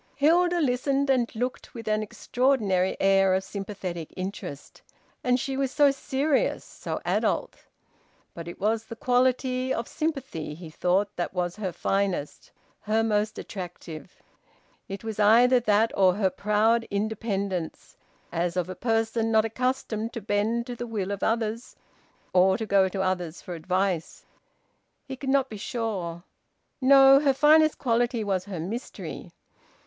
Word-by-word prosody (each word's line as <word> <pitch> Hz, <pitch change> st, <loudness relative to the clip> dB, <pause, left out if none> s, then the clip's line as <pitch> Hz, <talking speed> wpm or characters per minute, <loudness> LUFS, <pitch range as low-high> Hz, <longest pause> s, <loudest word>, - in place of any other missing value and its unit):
Hilda 345 Hz, +4 st, +3 dB
listened 275 Hz, 0 st, +1 dB
and 245 Hz, -3 st, +1 dB
looked 250 Hz, +3 st, -4 dB
with 230 Hz, -2 st, -8 dB
an 215 Hz, 0 st, +1 dB
extraordinary 215 Hz, -4 st, 0 dB
air 195 Hz, -1 st, +4 dB
of 190 Hz, -, -1 dB
sympathetic 190 Hz, -5 st, -6 dB
interest. 185 Hz, -6 st, -7 dB, 0.4 s
And 250 Hz, 0 st, +2 dB
she 270 Hz, +2 st, -3 dB
was 270 Hz, 0 st, 0 dB
so 285 Hz, 0 st, +5 dB
serious, 275 Hz, +1 st, 0 dB
so -, -, -6 dB
adult. -, -, 0 dB, 0.8 s
But 170 Hz, 0 st, -8 dB
it 170 Hz, -, -8 dB
was 220 Hz, +2 st, 0 dB
the 230 Hz, -, -8 dB
quality 255 Hz, +1 st, +1 dB
of 230 Hz, -2 st, -2 dB
sympathy, 275 Hz, -, -4 dB
he 165 Hz, -1 st, -10 dB
thought, 185 Hz, +5 st, 0 dB
that 175 Hz, +1 st, -3 dB
was 175 Hz, -1 st, -1 dB
her 195 Hz, -4 st, -3 dB
finest, 190 Hz, -3 st, -2 dB, 0.3 s
her 220 Hz, +2 st, 0 dB
most 210 Hz, -1 st, 0 dB
attractive. 175 Hz, -5 st, -8 dB, 0.7 s
It 195 Hz, +2 st, -6 dB
was 220 Hz, -1 st, -5 dB
either 240 Hz, +4 st, +6 dB
that 220 Hz, -1 st, +2 dB
or 185 Hz, -2 st, +4 dB
her 195 Hz, -2 st, +1 dB
proud 215 Hz, +4 st, +1 dB
independence, 200 Hz, -4 st, -3 dB, 0.4 s
as 170 Hz, +1 st, -1 dB
of 180 Hz, 0 st, -1 dB
a 185 Hz, -, -5 dB
person 225 Hz, +2 st, 0 dB
not 220 Hz, 0 st, +4 dB
accustomed 230 Hz, -1 st, -2 dB
to 235 Hz, -, -4 dB
bend 215 Hz, +4 st, 0 dB
to 245 Hz, -1 st, -6 dB
the 240 Hz, 0 st, -6 dB
will 205 Hz, -4 st, -3 dB
of 200 Hz, -, -4 dB
others 225 Hz, +1 st, -1 dB, 0.6 s
or 190 Hz, +1 st, +4 dB
to 225 Hz, -, -3 dB
go 195 Hz, -2 st, +3 dB
to 190 Hz, 0 st, -2 dB
others 180 Hz, -3 st, -2 dB
for 180 Hz, -, -8 dB
advice. 180 Hz, +1 st, -2 dB, 0.8 s
He 265 Hz, -, -6 dB
could 265 Hz, +1 st, -5 dB
not 270 Hz, -1 st, +3 dB
be 220 Hz, -, -8 dB
sure... 200 Hz, -, -4 dB, 0.6 s
No! 270 Hz, +1 st, +7 dB
Her 280 Hz, -2 st, +2 dB
finest 310 Hz, +2 st, +5 dB
quality 240 Hz, -2 st, 0 dB
was 190 Hz, -3 st, -1 dB
her 195 Hz, -4 st, -6 dB
mystery. 210 Hz, +10 st, -6 dB
215 Hz, 150 wpm, -26 LUFS, 190-250 Hz, 0.8 s, No